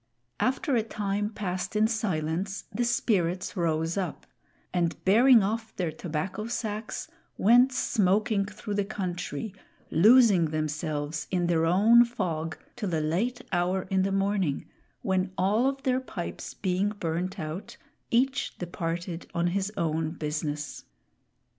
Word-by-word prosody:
After 265 +1 +1
a 230 - +3
time 205 -1 -2
passed 195 -2 -4
in 215 +1 +4
silence, 190 -3 -2
the 240 - 0
Spirits 185 -7 0
rose 165 -1 0
up, 185 -5 -3 0.5
and 170 -2 +1
bearing 230 +3 +7
off 220 +2 -3
their 175 -4 -1
tobacco 175 +6 -4
sacks, 220 0 -4 0.3
went 245 +5 +6
smoking 210 -3 +1
through 215 0 -6
the 205 0 +1
country, 185 -3 -4 0.4
losing 210 -1 +6
themselves 155 -1 -2
in 180 -2 +1
their 165 -1 +2
own 215 +7 +6
fog, 170 -9 -3 0.2
till 210 -7 -3
a - - +1
late 215 +12 -1
hour 180 +1 +1
in 190 0 +3
the 195 +1 +1
morning, 195 -6 0 0.4
when 190 -3 0
all 210 +7 +3
of 270 0 -2
their 255 -1 +2
pipes 205 -9 -6
being 190 +1 0
burned 185 -1 -3
out, 155 +4 -6 0.3
each 265 +3 +1
departed 170 0 -4
on 170 0 +1
his 195 +1 -1
own 160 -1 0
business. 150 -2 -4
190 Hz, 135 wpm, -28 LUFS, 165-220 Hz, 0.5 s, bearing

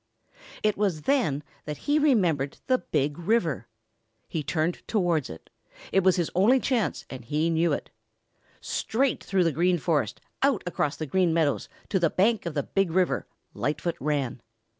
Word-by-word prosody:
It 210 -1 +2
was 190 -7 0
then 195 - +1 0.2
that 150 -1 -4
he 295 +1 +3
remembered 175 - +2
the 255 -1 +2
Big 145 +3 -1
River. 170 - 0 0.6
He 160 - -2
turned 160 +3 -1
towards 175 - +1
it. 80 - -11 0.4
It 195 - +3
was 185 -1 +5
his 175 -3 -1
only 215 +9 +5
chance 245 -5 -1
and 130 - -8
he 155 +6 0
knew 165 +1 +2
it. - - -3 0.7
Straight 260 +4 0
through 190 -2 +2
the 165 - +2
Green 175 +4 +2
Forest, 150 - 0 0.2
out 270 -6 +2
across 150 -4 -1
the 155 - -4
Green 170 +2 +2
Meadows 155 -4 +1 0.2
to 195 - +2
the 170 -2 +3
bank 205 +1 +2
of 165 - -4
the 145 - 0
Big 195 -2 0
River, 180 +1 +1 0.3
Lightfoot 160 +3 -2
ran. 140 -4 -1
170 Hz, 165 wpm, -27 LUFS, 150-200 Hz, 0.7 s, was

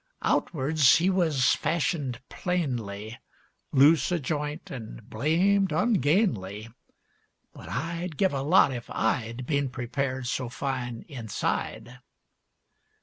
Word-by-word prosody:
Outwards 150 -2 +3
he 180 +3 +3
wuz 160 -9 +3
fashioned 145 -5 -1
plainly, 120 - -3 0.5
Loose 150 +5 +5
o' 175 - +2
joint 150 +2 -4
an' 110 - -7
blamed 190 +6 +2
ungainly, 140 - +1 0.8
But - - -11
I'd 165 +4 -4
give 190 -4 +2
a 135 - -1
lot 145 -1 +4
if 120 -2 -7
I'd 115 +2 -1
Been 140 -1 0
prepared 130 +1 -3
so 125 0 -2
fine 125 -3 -4
inside. 125 -1 -4
140 Hz, 105 wpm, -27 LUFS, 125-165 Hz, 0.8 s, Loose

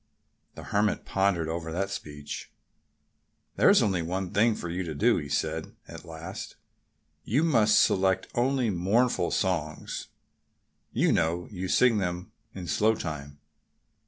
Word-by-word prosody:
The - - -9
Hermit 105 +1 0
pondered 95 -4 +1
over 80 0 -4
that 95 +4 -2
speech. 75 -6 -7 1.0
"There's - - +5
only 95 -4 +1
one 90 +2 -3
thing 110 +2 +3
for 85 - -6
you 90 +2 -3
to 80 -4 -4
do," - - +3
he 70 - -5
said 80 +2 -2
at - - -10
last. 80 0 -8 0.7
"You 135 - +1
must 115 -10 +4
select 95 0 +2
only 125 -1 +1
mournful 95 +2 +1
songs.... 80 -5 -2 0.8
You - - +2
know 85 +2 0
you 95 -2 -4
sing 115 +2 +4
them 90 -1 -3 0.2
in 95 -2 -6
slow 110 +6 +2
time." 70 -5 -6
90 Hz, 135 wpm, -28 LUFS, 80-105 Hz, 1.0 s, There's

